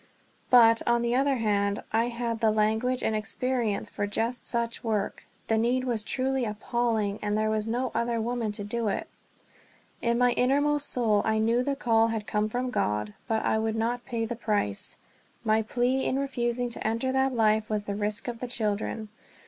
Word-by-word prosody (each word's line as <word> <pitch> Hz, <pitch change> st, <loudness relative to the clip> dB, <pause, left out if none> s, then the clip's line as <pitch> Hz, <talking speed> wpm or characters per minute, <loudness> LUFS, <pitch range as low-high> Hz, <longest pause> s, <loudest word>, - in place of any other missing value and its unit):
But, 230 Hz, -2 st, +7 dB
on 235 Hz, 0 st, +3 dB
the 235 Hz, 0 st, +1 dB
other 275 Hz, +1 st, +3 dB
hand, 205 Hz, -3 st, 0 dB
I 225 Hz, +1 st, +3 dB
had 235 Hz, -1 st, -3 dB
the 225 Hz, -1 st, +3 dB
language 220 Hz, +4 st, +1 dB
and 220 Hz, -, +1 dB
experience 230 Hz, 0 st, -1 dB
for 205 Hz, -, -3 dB
just 230 Hz, +4 st, -2 dB
such 235 Hz, -1 st, -2 dB
work, 215 Hz, -3 st, -2 dB, 0.2 s
the 225 Hz, 0 st, +1 dB
need 245 Hz, +3 st, +1 dB
was 235 Hz, -4 st, -1 dB
truly 265 Hz, +3 st, -1 dB
appalling, 220 Hz, -1 st, -1 dB
and 210 Hz, 0 st, 0 dB
there 215 Hz, 0 st, +1 dB
was 215 Hz, 0 st, -1 dB
no 245 Hz, +2 st, -1 dB
other 235 Hz, 0 st, 0 dB
woman 230 Hz, -1 st, -1 dB
to 205 Hz, -1 st, -3 dB
do 225 Hz, +2 st, -2 dB
it. 200 Hz, -, -2 dB, 0.9 s
In 235 Hz, 0 st, +1 dB
my 245 Hz, 0 st, +4 dB
innermost 285 Hz, +4 st, +2 dB
soul 220 Hz, -4 st, +2 dB
I 220 Hz, 0 st, +1 dB
knew 230 Hz, +3 st, +2 dB
the 280 Hz, +1 st, -1 dB
call 225 Hz, -4 st, +3 dB
had 225 Hz, -2 st, -3 dB
come 210 Hz, +1 st, 0 dB
from 250 Hz, +2 st, -2 dB
God, 105 Hz, -, -1 dB
but 220 Hz, -1 st, 0 dB
I 220 Hz, -, +2 dB
would 220 Hz, 0 st, -1 dB
not 235 Hz, +2 st, -1 dB
pay 230 Hz, -3 st, -2 dB
the 240 Hz, +2 st, -4 dB
price. 210 Hz, -, -1 dB, 0.5 s
My 220 Hz, -1 st, +3 dB
one 220 Hz, -, -1 dB
plea 250 Hz, +3 st, +1 dB
in 260 Hz, -, 0 dB
refusing 245 Hz, -3 st, -1 dB
to 230 Hz, -, -3 dB
enter 230 Hz, +4 st, 0 dB
that 265 Hz, 0 st, +1 dB
life 215 Hz, -1 st, +2 dB
was 210 Hz, -1 st, -1 dB
the 205 Hz, -, -4 dB
risk 210 Hz, +2 st, -2 dB
to 245 Hz, -, -2 dB
the 235 Hz, +2 st, -6 dB
children. 215 Hz, -1 st, -2 dB
230 Hz, 195 wpm, -27 LUFS, 215-245 Hz, 0.9 s, But